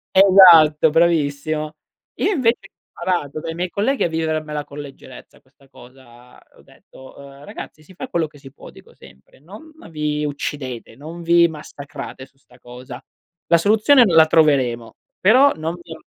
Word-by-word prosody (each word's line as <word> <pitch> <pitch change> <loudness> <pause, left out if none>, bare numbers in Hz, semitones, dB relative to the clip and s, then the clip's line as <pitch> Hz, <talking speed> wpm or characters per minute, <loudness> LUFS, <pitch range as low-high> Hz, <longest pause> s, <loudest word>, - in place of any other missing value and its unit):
Esatto, 180 -6 +6
bravissimo. 155 -2 0 0.4
Io - - -1
invece 245 - +1
ho - - -22
imparato 170 -5 -2
dai 165 - -6
miei 180 +2 -4
colleghi 220 +9 -1
a - - +1
vivermela 155 -2 -3
con 145 - -11
leggerezza 135 -3 -13
questa 135 +1 -28
cosa, 125 -1 -18 0.2
ho - - -21
detto, 130 0 -18
uhm: 140 0 -14
"Ragazzi 155 - -11
si 170 - -18
fa 260 +8 -8
quello 170 -8 -1
che 150 -1 -15
si 135 -1 -14
può, 140 - -15
dico - - -19
sempre, 65 0 -20
non 205 - -14 0.2
vi 150 -1 -3
uccidete, 140 -5 -6
non 160 +6 -10
vi 170 0 +4
massacrate 145 -3 -10
su 135 - -31
'sta 125 -2 -24
cosa. 125 +1 -11 0.5
La 170 - +6
soluzione 220 - +4
la 165 -5 +5
troveremo, 130 -8 +1 0.2
però 255 +8 +4
non 160 +2 -5
vi 170 -1 -11
am" 160 - -14
155 Hz, 165 wpm, -19 LUFS, 140-170 Hz, 0.5 s, Esatto